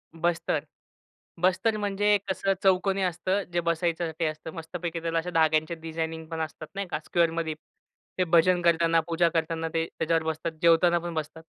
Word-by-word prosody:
बस्तर, 165 -3 0 0.8
बस्तर 190 +4 +2
म्हणजे 205 0 +2
कसं 195 +1 +1
चौकोनी 190 +1 +3
असतं 185 +3 0
जे 175 - +2
बसायच्यासाठी 170 0 -1
असतं. 155 +1 -4
मस्तपैकी 165 0 -5
त्याला 165 0 -1
अशा 180 +2 -4
धाग्यांचे 160 +1 +3
डिझायनिंग 160 0 -4
पण 165 -1 -3
असतात 155 0 -6
नाही 200 -1 -3
का - - -3
स्क्वेअरमध्ये 165 -2 +1 0.7
ते - - +5
भजन 175 +1 +4
करताना, 165 -1 +3
पूजा 170 0 +2
करताना 165 0 0
ते 165 0 +1
त्याच्यावर 165 0 +1
बसतात 160 +1 -2
जेवताना 170 +1 +5
पण 170 0 -5
बसतात. 155 +1 -5
165 Hz, 155 wpm, -27 LUFS, 160-180 Hz, 0.8 s, ते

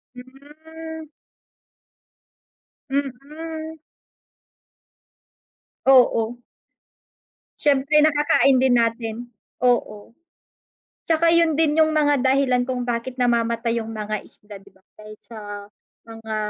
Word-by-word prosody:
Hmm. 310 +5 -12 1.8
Mm. 310 +4 -5 2.1
Oo. 245 -3 +4 1.2
Siyempre 285 +1 +2
nakakain 295 -2 +3
din 255 -1 +3
natin, 230 -1 -1 0.4
oo. 235 -3 -1 0.9
Tsaka 330 0 +3
yun 335 -1 +3
din 315 0 +1
yung 315 0 +3
mga 290 -2 +2
dahilan 260 -1 +1
kung 250 -1 -3
bakit 240 +1 -3
namamatay 235 -1 0
yung 225 0 -6
mga 215 0 -4
isda, 205 -1 -13
'di 200 0 -20
ba, 190 - -28 0.2
dahil 215 0 -11
sa 230 -2 -12 0.6
mga 225 -1 -7
260 Hz, 90 wpm, -22 LUFS, 230-300 Hz, 2.1 s, Oo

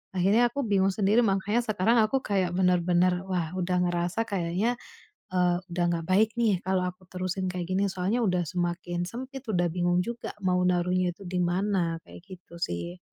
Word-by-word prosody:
Akhirnya 210 +7 +4
aku 280 +1 -2
bingung 195 -1 +3
sendiri. 210 +3 +3
Mangkanya 205 +3 +1
sekarang 215 0 +2
aku 265 +5 +1
kayak 190 -4 0
benar-benar, 180 0 +2
"Wah 175 -4 -1
udah 180 0 0
ngerasa 175 +5 -1
kayaknya," 195 +4 0 0.6
Eee, 180 -1 +2 0.2
"udah 175 0 0
gak 165 -1 -2
baik 215 +3 +4
nih, 210 -6 +2
kalau 185 0 0
aku 180 +1 -10
terusin 185 0 -2
kayak 180 -1 -3
gini. 195 +2 +1
Soalnya 190 +5 -1
udah 180 -4 +1
semakin 175 0 -2
sempit, 260 +5 -7
udah 175 -4 +1
bingung 175 0 +1
juga 235 +1 -5
mau 180 -1 +2
naruhnya 180 0 +1
itu 200 - -12
di 180 0 -1
mana" 180 -1 0
Kayak - - -12 0.2
gitu 170 -1 -18
sih. 85 - -3
185 Hz, 175 wpm, -27 LUFS, 175-200 Hz, 0.6 s, Akhirnya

